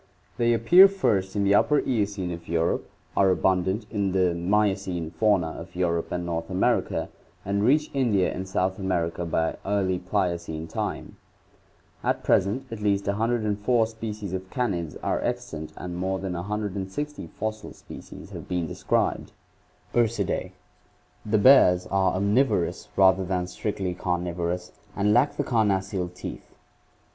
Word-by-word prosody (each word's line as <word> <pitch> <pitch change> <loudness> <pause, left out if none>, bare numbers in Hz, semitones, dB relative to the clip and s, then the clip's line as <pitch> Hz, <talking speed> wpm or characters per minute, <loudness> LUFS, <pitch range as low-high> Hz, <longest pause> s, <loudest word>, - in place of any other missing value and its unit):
They 120 0 +3
appear 175 - +8
first 105 - 0
in 100 - +1
the 100 0 +3
Upper 145 +8 +4
Eocene 100 -8 -1
of 85 -1 -8
Europe, 85 0 0 0.3
are 95 -1 +4
abundant 95 +3 +1
in 100 -3 0
the 90 -2 +2
Miocene 95 -2 0
fauna 90 -1 +2
of 85 +2 -10
Europe 85 -2 -1
and 90 -1 -2
North 85 -1 -3
America, 95 -1 0 0.4
and 100 +1 0
reach 150 +6 +3
India 115 -9 +2
and 95 +1 -5
South 95 0 -1
America 85 -3 -1
by 80 0 0
early 95 -2 0
Pliocene 85 -4 -2
time. 80 - -4 0.9
At - - 0
present 100 +8 +2
at 115 -2 -6
least 100 -1 +1
104 110 +1 +1
species 110 -3 -6
of 95 0 -5
canids 90 - -2
are - - 0
extant 75 0 -4
and 90 -1 -6
more 95 +2 -1
than 95 -1 -4
160 100 - -4
fossil 110 +5 -5
species - - -11
have - - -8
been 90 -2 -1
described. - - -1 0.6
Ursidss. 115 -5 0 0.4
— - - -36
The 110 - +5
bears 100 -6 +6
are 95 -1 +2
omnivorous 100 -1 +1
rather 95 0 +5
than 90 -1 -1
strictly 95 0 -3
carnivorous 90 0 -2 0.2
and 105 +1 +2
lack 125 +5 +3
the 145 - +1
carnassial 100 -6 0
teeth. 90 - -9
95 Hz, 140 wpm, -26 LUFS, 90-105 Hz, 0.9 s, appear